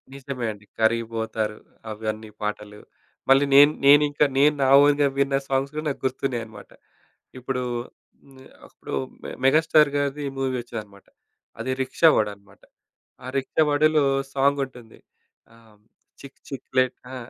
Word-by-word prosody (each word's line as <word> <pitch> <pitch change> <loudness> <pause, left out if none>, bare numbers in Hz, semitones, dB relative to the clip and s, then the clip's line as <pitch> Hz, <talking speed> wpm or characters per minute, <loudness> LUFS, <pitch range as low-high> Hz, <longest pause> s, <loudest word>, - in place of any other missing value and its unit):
నిజమే 135 -3 -6
అండి. 105 0 -13 0.2
కరిగిపోతారు 110 -1 -1 0.3
అవన్నీ 110 0 -5
పాటలు. 105 0 -5 0.5
మళ్ళీ 135 +1 +5
నేను 145 +1 +8
నేను 145 +1 +7
ఇంకా 145 +1 +2
నేను 150 +2 +5
నా - - +2 0.2
ఓన్‌గా 145 0 +3
విన్న 140 0 +1
సాంగ్స్ 135 +1 0
కూడా 155 +1 -4
నాకు 140 - -6
గుర్తున్నాయి 130 -2 -2
అన్నమాట. 110 -2 -14 0.7
ఇప్పుడు 125 0 -3 0.7
మె 130 - -16 0.2
అప్పుడు - - -11 0.3
మె - - -7
మెగాస్టార్ 155 +1 +4
గారిది 145 +1 -2
మూవీ 135 -1 -1
వచ్చిందన్నమాట. 105 -5 -10 0.5
అది 130 +3 -3
రిక్షా 160 +5 +3
వాడు 105 - +1
అన్నమాట. 100 0 -23 0.6
ఆ - - -7
రిక్షా 135 +4 -1
వాడులో 150 +1 +3 0.3
సాంగ్ 140 +1 +2
ఉంటుంది. 120 -3 -16 0.5
ఆహ్, 110 -2 -22 0.4
చిక్ 140 -1 -13
చిక్ 135 - -8
ప్లేట్ 130 -1 +2 0.2
ఆ! - - -7
130 Hz, 140 wpm, -23 LUFS, 110-140 Hz, 0.7 s, నేను